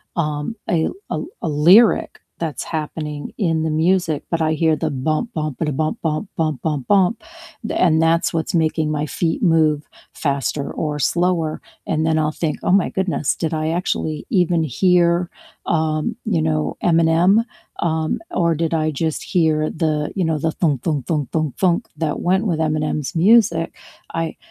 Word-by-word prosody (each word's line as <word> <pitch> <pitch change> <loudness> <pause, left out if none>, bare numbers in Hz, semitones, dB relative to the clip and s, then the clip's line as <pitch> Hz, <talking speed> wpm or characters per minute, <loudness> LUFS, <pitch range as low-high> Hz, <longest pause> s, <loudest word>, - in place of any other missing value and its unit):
um, 150 +4 -2
a 160 -2 +1
l - - -5 0.2
a - - 0 0.3
a - - 0 0.2
lyric 215 +5 +5 0.2
that's 155 - -4 0.2
happening 150 -1 -6
in 165 -6 0
the 160 - 0 0.2
music, 175 -5 +1
but 165 -1 0
I 155 0 +2
hear 160 0 +2
the 160 0 -1
bump, 155 - -2
bump, 155 -4 -3
ba-da, 150 -3 -1
bump, 155 +3 -1
bump, 155 -2 -2
bump, 155 -6 -1
bump, 150 -5 -2
bump, 200 +2 +3 0.5
and 170 -4 +3
a - - +2
that's 165 +1 +2
what's 165 +1 -2
making 160 -1 +1
my 150 -1 -1
feet 160 +4 -2
move 155 -4 +3 0.3
faster 140 0 -2
or 150 -2 -3
slower. 170 0 0 0.3
And 155 0 0
then 160 0 +2
I'll 155 0 +1
think, 155 -2 +1
"Oh - - +1
my 190 0 +3
goodness, 190 -6 0
did 165 -1 -2
I 155 0 -1
actually 155 -3 -2
even 175 -3 +2
hear, 175 +3 +2 0.4
um, 155 -1 0
you 85 - +1
know, 80 0 -1
Eminem? 170 +5 +4 0.4
Um, 160 -2 0
or 170 -2 +1
did 165 +1 -1
I 155 -1 +1
just 155 +2 -2
hear 155 -4 +1
the, 155 -2 -1
you 190 -3 0
know, 160 -1 0
the 160 +2 -1
thunk, 150 -7 0
thunk, 150 -6 -1
thunk, 150 -6 -1
thunk, 155 -4 -1
thunk 185 +4 +1
that 155 -3 -2
went 190 +5 +1
with 165 -5 0
Eminem's 155 -2 -1
music?" 185 -2 +4 0.5
I 165 - -4
160 Hz, 175 wpm, -20 LUFS, 150-170 Hz, 0.5 s, lyric